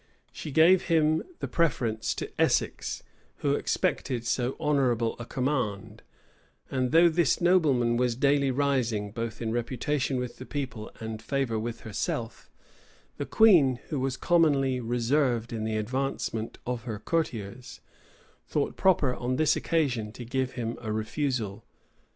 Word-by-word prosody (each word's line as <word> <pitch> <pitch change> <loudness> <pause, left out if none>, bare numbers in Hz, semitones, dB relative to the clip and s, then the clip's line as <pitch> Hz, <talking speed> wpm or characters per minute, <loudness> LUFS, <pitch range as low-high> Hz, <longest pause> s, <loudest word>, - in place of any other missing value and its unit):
She - - -7
gave 165 +6 +5
him 160 -2 +3 0.2
the - - -2
preference 120 -9 0
to - - -5
Essex, - - 0 0.4
who - - +3
expected 120 -3 -1
so 125 +2 -1
honorable 125 -6 +1
a 120 - -6
command; 125 -7 -2 0.7
and 130 -2 0
though 165 +2 +7
this 170 -2 +2
nobleman 145 -10 +3
was 125 -1 +1
daily 140 +1 +2
rising, 125 -7 0
both 115 +1 -4
in 110 - -1
reputation 130 +3 -1
with 125 -1 -4
the 130 - -8
people, 125 -7 -4
and 110 -1 -5
favor 130 -3 -1
with 115 +1 -5
herself, 115 +2 -4 0.7
the - - -4
queen, 165 - +5
who 145 - -2
was 130 0 -1
commonly 140 -7 +3
reserved 120 0 0
in 110 -1 -3
the 110 -1 -1
advancement 115 -1 -2
of 125 -1 -3
her 110 -3 -4
courtiers, 120 -4 -3 0.7
thought - - -1
proper 165 -9 +3
on 125 +1 -2
this 155 +3 +3
occasion 125 -10 0
to 120 - -8
give 130 +2 -2
him 115 -2 -4
a 110 -2 -4
refusal. 110 -1 -2
125 Hz, 140 wpm, -28 LUFS, 115-145 Hz, 0.7 s, though